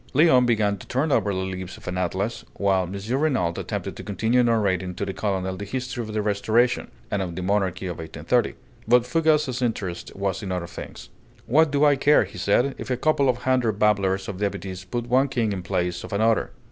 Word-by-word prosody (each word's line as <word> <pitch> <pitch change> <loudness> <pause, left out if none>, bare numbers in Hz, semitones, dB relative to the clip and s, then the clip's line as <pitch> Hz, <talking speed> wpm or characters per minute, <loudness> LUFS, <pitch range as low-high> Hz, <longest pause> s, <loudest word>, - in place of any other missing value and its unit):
Léon 130 -5 +5
began 105 -3 +2
to - - -12
turn 140 +5 0
over 105 - +2
the 95 -1 -2
leaves 95 -1 -5
of - - -15
an 90 - -2
atlas, 95 +6 -2
while 95 -2 +2
M. 105 +7 -2
Renault 130 - +1
attempted - - -4
to - - -8
continue 115 +5 +1
narrating 100 -6 +1
to - - -3
the 95 - -4
colonel 95 -1 -2
the 100 - -6
history 125 +3 -4
of 110 -2 -6
the 105 -1 -1
Restoration, 110 +4 +1 0.2
and 100 - 0
of 90 -3 -4
the 90 - -4
monarchy 95 -1 0
of 90 -2 -5
1830. 80 -1 -1 0.3
But 120 +1 +5
Fougas's 150 -2 +1
interest 105 -8 -3
was 95 -1 -2
in 95 - -5
other 90 -2 -2
things. 85 - -9 0.4
"What 155 +5 +4
do 145 +1 +3
I 145 -2 +5
care," 145 +2 +4
said 100 +5 +2
he, 140 - -3
"if - - -6
a 125 - 0
couple 140 -1 +2
of 125 -1 -1
hundred 125 -5 +1
babblers 95 -2 +2
of 95 -2 -5
deputies 95 -2 -3
put 120 +5 -3
one 130 +3 +3
king 115 -6 0
in 95 - -4
place 90 0 -2
of - - -8
another? 110 +2 +2
105 Hz, 210 wpm, -24 LUFS, 95-125 Hz, 0.4 s, Léon